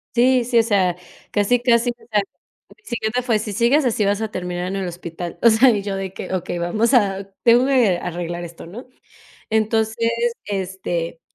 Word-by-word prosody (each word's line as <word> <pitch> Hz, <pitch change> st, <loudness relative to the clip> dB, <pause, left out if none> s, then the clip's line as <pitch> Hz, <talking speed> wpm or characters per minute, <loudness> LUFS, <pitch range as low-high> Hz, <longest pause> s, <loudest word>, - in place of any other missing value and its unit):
Sí, 250 Hz, +1 st, +4 dB
sí, 240 Hz, -1 st, +3 dB
o -, -, +4 dB
sea, 195 Hz, -6 st, +1 dB, 0.4 s
casi, 210 Hz, +4 st, +2 dB
casi, 240 Hz, 0 st, +3 dB
o -, -, -8 dB, 0.2 s
sea, 210 Hz, -1 st, +3 dB
sí, -, -, -8 dB, 0.5 s
el 425 Hz, -, -32 dB
psiquiatra 235 Hz, 0 st, -2 dB
fue: 235 Hz, -3 st, +1 dB
"Si 210 Hz, -1 st, -5 dB
sigues 245 Hz, +7 st, +3 dB
así, 225 Hz, -3 st, +1 dB
vas 200 Hz, +2 st, 0 dB
a 220 Hz, -1 st, -3 dB
terminar 180 Hz, -1 st, -4 dB
en 190 Hz, -, -3 dB
el 190 Hz, -2 st, -3 dB
hospital". 170 Hz, 0 st, -7 dB
O 235 Hz, -, +7 dB
sea, 230 Hz, +4 st, +5 dB
y 210 Hz, -4 st, +1 dB
yo 200 Hz, -1 st, -3 dB
de 195 Hz, -1 st, -5 dB
que, -, -, -6 dB
okey, 180 Hz, -1 st, -3 dB
vamos 215 Hz, +9 st, 0 dB
a 195 Hz, -4 st, +1 dB
tengo 240 Hz, +1 st, +5 dB
que 235 Hz, -10 st, +3 dB
arreglar 175 Hz, 0 st, -4 dB
esto, 170 Hz, -1 st, -10 dB
¿no? 215 Hz, +10 st, -10 dB, 0.6 s
Entonces, 220 Hz, +1 st, +1 dB, 0.3 s
este 185 Hz, -4 st, -4 dB
210 Hz, 195 wpm, -21 LUFS, 180-235 Hz, 0.6 s, O